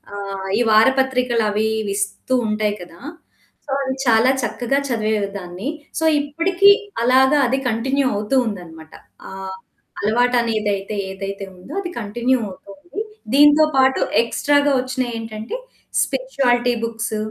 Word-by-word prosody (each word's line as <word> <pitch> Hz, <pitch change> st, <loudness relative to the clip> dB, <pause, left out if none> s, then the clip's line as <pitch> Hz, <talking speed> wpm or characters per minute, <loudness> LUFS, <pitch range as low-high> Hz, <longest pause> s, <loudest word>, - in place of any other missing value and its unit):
ఆహ్, 195 Hz, -1 st, -5 dB
ఈ -, -, +1 dB
వారపత్రికలవి 235 Hz, -3 st, +2 dB, 0.2 s
విస్తూ 200 Hz, +5 st, -2 dB
ఉంటాయి 215 Hz, -1 st, 0 dB
కదా! 170 Hz, -1 st, -12 dB, 0.7 s
సో, 280 Hz, -, -8 dB
అది 265 Hz, -1 st, -2 dB
చాలా 230 Hz, +1 st, +4 dB
చక్కగా 245 Hz, +3 st, -1 dB
చదివేదాన్ని. 205 Hz, -3 st, -2 dB, 0.3 s
సో 320 Hz, -, 0 dB
ఇప్పటికి 335 Hz, +7 st, +3 dB, 0.3 s
అలాగా 265 Hz, +4 st, +4 dB
అది 260 Hz, +2 st, 0 dB
కంటిన్యూ 265 Hz, +5 st, 0 dB
అవుతూ 210 Hz, +5 st, -1 dB
ఉందనమాట. 165 Hz, -6 st, -8 dB, 0.4 s
ఆహ్, 190 Hz, 0 st, -7 dB, 0.4 s
అలవాటనేదైతే 215 Hz, -3 st, +1 dB, 0.2 s
ఏదైతే 195 Hz, +1 st, -6 dB
ఉందో 180 Hz, -, -12 dB
అది 350 Hz, -, -6 dB
కంటిన్యూ 240 Hz, +4 st, 0 dB
అవుతుంది. 290 Hz, -, -9 dB, 0.3 s
దీంతో 295 Hz, +2 st, +7 dB
పాటు 265 Hz, 0 st, +3 dB, 0.2 s
ఎక్స్‌ట్రాగా 285 Hz, +4 st, +2 dB
వచ్చినయేంటంటే 230 Hz, -, -4 dB, 0.4 s
స్పిరుచువాలిటీ 245 Hz, -, +1 dB
బుక్స్. 225 Hz, -1 st, -3 dB
230 Hz, 105 wpm, -20 LUFS, 205-265 Hz, 0.7 s, దీంతో